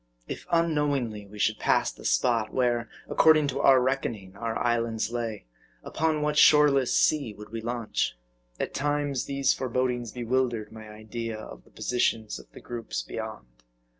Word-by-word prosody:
If -, -, -7 dB
unknowingly 145 Hz, -10 st, 0 dB
we 105 Hz, +1 st, -12 dB
should 105 Hz, -, +1 dB
pass -, -, +2 dB
the -, -, -14 dB
spot 115 Hz, -3 st, +2 dB
where, 120 Hz, -2 st, 0 dB, 0.2 s
according 155 Hz, -2 st, +5 dB
to 130 Hz, -, -3 dB
our 135 Hz, -1 st, +6 dB
reckoning, 120 Hz, -7 st, -2 dB
our 115 Hz, +2 st, -3 dB
islands 115 Hz, -2 st, 0 dB
lay, 115 Hz, -, -4 dB, 0.4 s
upon 155 Hz, -2 st, 0 dB
what 150 Hz, 0 st, +2 dB
shoreless 145 Hz, -4 st, +6 dB
sea 140 Hz, -9 st, +2 dB
would 105 Hz, 0 st, -11 dB
we 115 Hz, 0 st, -4 dB
launch? 115 Hz, -, -2 dB, 0.4 s
At -, -, -3 dB
times, 145 Hz, -2 st, -1 dB
these 140 Hz, -1 st, +2 dB
forebodings 125 Hz, -2 st, -1 dB
bewildered 120 Hz, -2 st, -1 dB
my 110 Hz, -1 st, -10 dB
idea 110 Hz, +1 st, -6 dB
of 110 Hz, -, -10 dB
the -, -, -21 dB
positions 115 Hz, -3 st, -1 dB
of -, -, -16 dB
the -, -, -12 dB
groups 115 Hz, -, -5 dB
beyond. -, -, -6 dB
120 Hz, 155 wpm, -27 LUFS, 110-140 Hz, 0.4 s, our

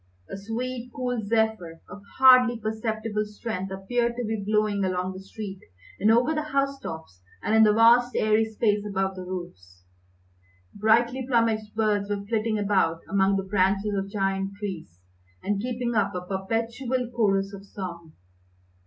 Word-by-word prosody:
A -, -, -4 dB
sweet, 240 Hz, +4 st, -5 dB
cool 250 Hz, -3 st, -2 dB
zephyr 220 Hz, -7 st, 0 dB
of 205 Hz, -, -10 dB, 0.2 s
hardly 255 Hz, -2 st, +7 dB
perceptible 220 Hz, 0 st, -2 dB
strength 210 Hz, -2 st, -5 dB
appeared 235 Hz, +5 st, -1 dB
to 245 Hz, -1 st, -3 dB
be 215 Hz, -1 st, -3 dB
blowing 210 Hz, -1 st, +1 dB
along 185 Hz, 0 st, -1 dB
the 185 Hz, -, -8 dB
street 195 Hz, 0 st, -8 dB, 0.4 s
and 210 Hz, -, +3 dB
over 240 Hz, +7 st, +4 dB
the 305 Hz, -, -1 dB
house 275 Hz, -2 st, -1 dB
tops 160 Hz, -, -8 dB, 0.2 s
and 215 Hz, -, 0 dB
in 220 Hz, -, +6 dB
the 215 Hz, -1 st, +6 dB
vast 235 Hz, +3 st, +5 dB
airy 215 Hz, +1 st, +3 dB
space 210 Hz, -1 st, 0 dB
above 195 Hz, -2 st, -2 dB
the 185 Hz, -, -7 dB
roofs. 135 Hz, -, -8 dB, 0.9 s
Brightly 235 Hz, +5 st, +2 dB
plumaged 225 Hz, -4 st, +1 dB
birds 210 Hz, -2 st, +1 dB
were 200 Hz, -1 st, -3 dB
flitting 220 Hz, 0 st, 0 dB
about 190 Hz, -5 st, +1 dB
among 195 Hz, 0 st, +2 dB
the 195 Hz, -, -2 dB
branches 195 Hz, +1 st, +1 dB
of 195 Hz, 0 st, -2 dB
giant 195 Hz, -1 st, -1 dB
trees, 185 Hz, -, -7 dB, 0.4 s
and 200 Hz, 0 st, -1 dB
keeping 245 Hz, 0 st, -2 dB
up 205 Hz, -3 st, +1 dB
a 180 Hz, 0 st, -4 dB
perpetual 230 Hz, +6 st, -2 dB
chorus 195 Hz, -3 st, +1 dB
of 195 Hz, 0 st, -9 dB
song. 170 Hz, -5 st, -8 dB
210 Hz, 155 wpm, -26 LUFS, 195-230 Hz, 0.9 s, hardly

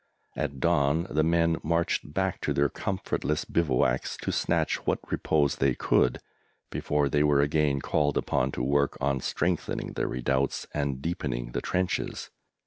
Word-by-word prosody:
At 70 Hz, -, -3 dB
dawn 70 Hz, +5 st, +2 dB
the 75 Hz, -, +2 dB
men 85 Hz, 0 st, +2 dB
marched 85 Hz, -2 st, 0 dB
back 95 Hz, +2 st, -1 dB
to -, -, 0 dB
their 70 Hz, 0 st, +2 dB
comfortless 80 Hz, -4 st, -2 dB
bivouacs 65 Hz, -5 st, +1 dB
to -, -, -1 dB
snatch -, -, +1 dB
what -, -, +2 dB
repose 75 Hz, -3 st, +1 dB
they 65 Hz, -2 st, +2 dB
could 60 Hz, -, +2 dB, 0.5 s
before 75 Hz, -1 st, 0 dB
they 75 Hz, +1 st, +1 dB
were 75 Hz, -1 st, +4 dB
again 75 Hz, -2 st, +1 dB
called 75 Hz, -1 st, +1 dB
upon -, -, 0 dB
to 60 Hz, -, -2 dB
work 70 Hz, +2 st, +1 dB
on 70 Hz, -1 st, 0 dB
strengthening 85 Hz, +6 st, -2 dB
the -, -, -1 dB
redoubts 65 Hz, +2 st, -1 dB
and 70 Hz, -2 st, -2 dB
deepening -, -, -3 dB
the -, -, -2 dB
trenches. 90 Hz, -1 st, -2 dB
75 Hz, 150 wpm, -28 LUFS, 70-80 Hz, 0.5 s, were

